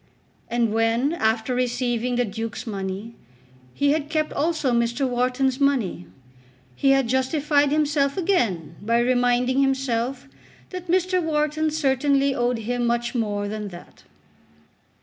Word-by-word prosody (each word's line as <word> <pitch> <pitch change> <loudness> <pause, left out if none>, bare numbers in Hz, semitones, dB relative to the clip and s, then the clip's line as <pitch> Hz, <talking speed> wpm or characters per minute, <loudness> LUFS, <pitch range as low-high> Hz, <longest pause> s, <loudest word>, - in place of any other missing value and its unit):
And 235 -2 +1
when 225 +6 +1
after 220 -4 0
receiving 245 -1 -1
the 245 0 +1
Duke's 225 +1 -5
money, 200 +1 -5 0.6
he 285 0 +2
had 300 -1 -1
kept 310 -1 -1
also 310 -3 0
Mr. 235 +3 +1
Wharton's 255 +2 0
money, 255 - 0 0.7
he 275 - +2
had 270 -2 +4
justified 285 +3 +1
himself 295 -1 +1
again 200 - 0
by 230 +3 +1
reminding 245 +2 +2
himself 265 -1 -1 0.4
that 365 -1 -7
Mr. 370 +1 +2
Wharton 310 -1 0
certainly 280 -2 +1
owed 245 -1 0
him 240 +2 -2
much 235 0 -1
more 205 -4 -1
than 210 0 -4
that. 175 -3 -12
250 Hz, 130 wpm, -23 LUFS, 230-285 Hz, 0.7 s, had